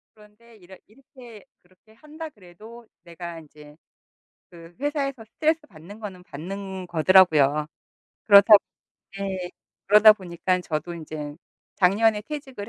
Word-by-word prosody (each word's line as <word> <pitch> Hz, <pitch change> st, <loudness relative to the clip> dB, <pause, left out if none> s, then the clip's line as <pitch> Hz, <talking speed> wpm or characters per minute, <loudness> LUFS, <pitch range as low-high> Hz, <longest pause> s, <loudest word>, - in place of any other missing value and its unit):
그런데 215 Hz, +2 st, -21 dB
이렇 190 Hz, -1 st, -16 dB
이렇게 240 Hz, -2 st, -16 dB, 0.2 s
그렇게 185 Hz, +5 st, -27 dB
한다 305 Hz, +6 st, -10 dB
그래도 220 Hz, -, -16 dB, 0.2 s
내가 170 Hz, -1 st, -9 dB
인제 150 Hz, -1 st, -17 dB, 0.7 s
그 170 Hz, -1 st, -15 dB
회사에서 275 Hz, -4 st, -3 dB
스트레스 315 Hz, +8 st, -1 dB
받는 180 Hz, -, -14 dB
거는 190 Hz, -4 st, -9 dB
받는 190 Hz, +3 st, -8 dB
거더라고요. 155 Hz, -4 st, +3 dB, 0.6 s
그렇다 205 Hz, +1 st, +8 dB, 0.7 s
예 190 Hz, -2 st, -4 dB, 0.4 s
그러다 210 Hz, +2 st, +8 dB
보니까 185 Hz, -1 st, -3 dB
저도 170 Hz, 0 st, -5 dB
이제 155 Hz, -2 st, -8 dB, 0.4 s
작년에 210 Hz, +3 st, +2 dB
퇴직을 265 Hz, -6 st, -8 dB
195 Hz, 285 characters per minute, -24 LUFS, 170-225 Hz, 0.7 s, 그렇다